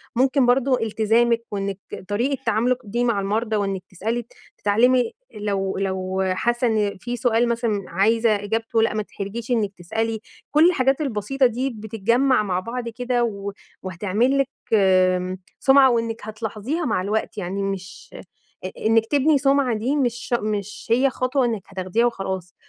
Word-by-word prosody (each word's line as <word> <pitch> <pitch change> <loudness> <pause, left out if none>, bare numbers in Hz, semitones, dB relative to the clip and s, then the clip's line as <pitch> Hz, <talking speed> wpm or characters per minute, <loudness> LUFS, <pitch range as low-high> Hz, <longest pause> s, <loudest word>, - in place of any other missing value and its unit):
ممكن 265 +2 +3
برضو 255 +1 +3
التزامِك 225 +2 +2
وإنِك 200 -1 -3 0.3
طريقة 245 +6 -1
تعاملِك 235 +3 +2
دي 235 +4 -2
مع 235 -4 +1
المرضى، 215 +3 -1
وإنك 195 -2 -1
تسألي، 225 +6 -3 0.3
تتعلمي، 240 +4 +3 0.2
لو 200 -2 -2
لو 190 -1 -2
حاسة 240 +6 0
إن 210 -3 0
في 240 +6 -4
سؤال 240 -1 +2
مثلًا 230 -4 -1
عايزة 220 +5 +2
إجابته، 225 +2 -1
لأ، 225 - +2
ما 215 - -1
تتحرجيش 215 +4 -6
إنِك 215 -5 +1
تسألي، 220 +6 -2 0.3
كل 310 +4 +6
الحاجات 270 -3 +1
البسيطة 265 0 0
دي 250 +3 0
بتتجمع 225 +2 +1
مع 185 -3 -1
بعض 235 +5 -5
كده 245 +1 -1
و 200 -3 -3 0.3
وهتعمل 205 +8 0
لِك 275 - +2 0.3
آمم 185 -2 +3 0.2
سُمعة، 270 0 +6
وإنِك 230 -1 -1
هتلاحظيها 220 - -4
مع 215 -7 0
الوقت، 210 +2 -2
يعني 195 +1 -3
مش 190 -2 -5 0.6
إ - - -2 0.2
إنِك 225 0 +4
تبني 290 +3 +3
سُمعة 275 -3 +2
دي 250 +7 -1
مش 245 -4 -1
مش 210 -1 -4
هي 255 +4 +4
خطوة 255 +1 0
إنِك 225 -4 -1
هتاخديها 190 +5 0
وخلاص، 190 -6 -3
225 Hz, 150 wpm, -22 LUFS, 200-245 Hz, 0.6 s, كل